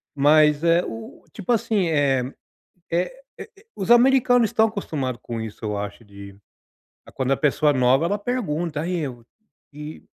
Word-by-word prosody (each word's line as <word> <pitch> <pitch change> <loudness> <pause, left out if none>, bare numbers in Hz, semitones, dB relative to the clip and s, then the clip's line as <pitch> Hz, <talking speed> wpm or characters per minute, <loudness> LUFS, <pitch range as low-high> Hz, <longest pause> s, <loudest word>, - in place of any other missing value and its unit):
mas, 150 +1 +4
eh, 170 +1 +3
o 115 0 -9
tipo 210 +2 -4
assim, 220 -5 +1
eh 135 -4 +1 0.6
eh 175 - 0 0.3
eh, - - -9 0.3
os 195 +3 -4
americanos 245 -1 +5
estão 220 +2 +2
acostumados 140 - -4
com 115 - -5
isso, 110 0 -7
eu 105 -1 -3
acho 100 +2 -6
de 100 -2 -12 0.8
quando 130 0 -1
a 135 - +2
pessoa 150 0 +2
é 145 - 0
nova, 130 +3 +3
ela 205 +4 0
pergunta, 175 - -3
"E 175 -3 -2
aí, - - -3 0.6
e 150 +2 -9
150 Hz, 160 wpm, -23 LUFS, 130-200 Hz, 0.8 s, americanos